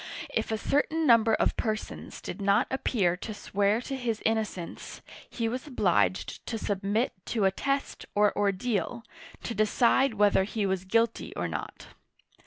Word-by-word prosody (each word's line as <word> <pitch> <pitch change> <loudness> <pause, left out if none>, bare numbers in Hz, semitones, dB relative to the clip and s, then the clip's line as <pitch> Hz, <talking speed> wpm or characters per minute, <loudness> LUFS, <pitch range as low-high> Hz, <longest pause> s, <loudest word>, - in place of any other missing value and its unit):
If - - -1
a 220 - 0
certain 310 +7 +1
number 230 -3 +5
of - - +1
per 215 -2 +1
sons 215 - -9
did - - -6
not 200 +4 +3
appear 205 -9 +1
to 215 +3 -6
swear 205 +2 +1
to 270 - -4
his 235 -4 -2
innocence, 215 -6 -3 0.3
he 230 -2 -2
was 255 +6 -4
obliged 195 -7 +1
to 225 - -2
submit 205 +3 -1
to 220 -4 +1
a 190 - +4
test, 275 +7 -2
or 210 0 +3
ordeal, 205 +3 -1 0.4
to 235 - -3
decide 230 +4 +3
whether 205 -2 +4
he 210 +1 -2
was 190 -1 -1
guilty 230 +4 0
or - - -1
not. - - -6
220 Hz, 160 wpm, -28 LUFS, 200-240 Hz, 0.4 s, number